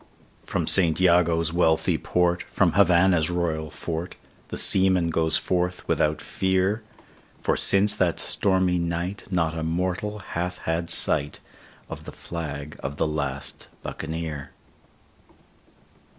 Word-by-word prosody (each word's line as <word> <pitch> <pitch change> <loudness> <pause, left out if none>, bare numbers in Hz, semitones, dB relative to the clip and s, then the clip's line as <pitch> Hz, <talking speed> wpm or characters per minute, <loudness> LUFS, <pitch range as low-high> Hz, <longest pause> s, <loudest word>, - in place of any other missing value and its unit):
From - - -1
St 85 -4 +5
Jago's 85 -2 +3
wealthy 80 -2 +2
port, 90 0 +1
from - - +2
Havannah's 90 -3 +4
royal 80 -3 -2
fort, 85 +4 -5 0.3
The - - -6
seaman 95 -3 +4
goes 80 0 +2
forth 90 0 -2
without 75 0 +1
fear; 95 +3 0 0.6
For - - +1
since 100 +1 +4
that 90 -3 +1
stormy 95 -2 +1
night 85 +3 -3
not 85 -4 0
a 80 - -3
mortal 90 +6 -2
hath 90 -2 -4
had 85 +1 -3
sight 75 -3 +1 0.5
Of - - -9
the - - -8
flag 75 -3 -7
of 70 +1 -5
the - - +1
last 70 -3 -3 0.2
Buccaneer. 80 -3 -5
85 Hz, 120 wpm, -24 LUFS, 80-90 Hz, 0.6 s, St